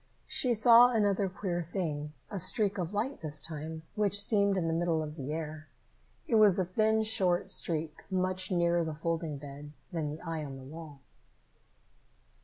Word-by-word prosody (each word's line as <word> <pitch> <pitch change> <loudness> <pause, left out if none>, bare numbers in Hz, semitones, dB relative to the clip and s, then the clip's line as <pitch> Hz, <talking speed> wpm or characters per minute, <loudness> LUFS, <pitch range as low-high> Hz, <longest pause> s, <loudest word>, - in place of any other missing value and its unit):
She 245 -2 +1
saw 235 +2 +7
another 205 -4 +1
queer 180 -2 -3
thing, 155 -4 -4 0.2
a 200 - -3
streak 195 +2 +2
of 175 -1 -3
light 225 +7 -3
this 150 -1 -3
time, 160 +1 -6
which 205 -1 +2
seemed 200 -1 +4
in 170 -3 -1
the 165 - 0
middle 165 -1 0
of 150 0 -7
the 140 -2 -6
air. 155 0 -5 0.6
It 225 - +2
was 210 -3 +6
a 185 - +1
thin, 220 +4 +1
short 185 -5 +1
streak, 160 -2 +1
much 185 0 -1
nearer 170 -2 +1
the 160 -1 -4
folding 165 -1 -3
bed 145 +1 -10 0.2
than 160 -3 -2
the 150 +2 -7
eye 165 -2 -4
on 135 -2 -7
the 135 - -11
wall. 150 0 -11
170 Hz, 175 wpm, -30 LUFS, 155-200 Hz, 0.6 s, saw